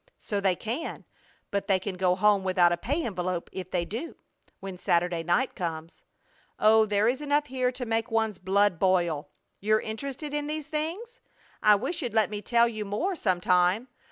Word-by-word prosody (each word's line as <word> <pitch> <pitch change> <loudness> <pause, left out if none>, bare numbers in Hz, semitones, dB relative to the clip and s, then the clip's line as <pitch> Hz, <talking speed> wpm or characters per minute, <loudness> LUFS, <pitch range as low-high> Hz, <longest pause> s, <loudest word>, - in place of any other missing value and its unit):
So 205 -1 -3
they 190 -2 +2
can, 240 - -5 0.5
but 200 -1 -2
they 195 - +4
can 190 +1 -4
go 180 0 +2
home 200 0 +3
without 185 -2 +4
a - - +2
pay 285 - -2
envelope 180 -4 -3
if 185 -1 -6
they 175 -2 -1
do, 235 - -6 0.4
when 190 -2 -7
Saturday 170 -1 +1
night 175 +11 +1
comes. 165 -2 -5 0.6
Oh, 220 0 +5
there 205 +1 +2
is 255 +4 0
enough 290 0 +1
here 255 -2 0
to 250 0 -5
make 225 +1 -1
one's 220 -3 0
blood 195 -1 +2
boil! 175 -5 +1 0.3
You're 215 +2 +2
interested 275 +7 -5
in 295 0 -2
these 305 0 -3
things? 335 +11 -4 0.4
I 210 -1 +6
wish 275 - -3
you'd 240 -5 -4
let 220 -1 +3
me 205 -1 -4
tell 235 +2 +3
you 215 -2 -4
more 210 - -2
some 185 - 0
time. 180 +7 +2
210 Hz, 185 wpm, -27 LUFS, 185-255 Hz, 0.6 s, I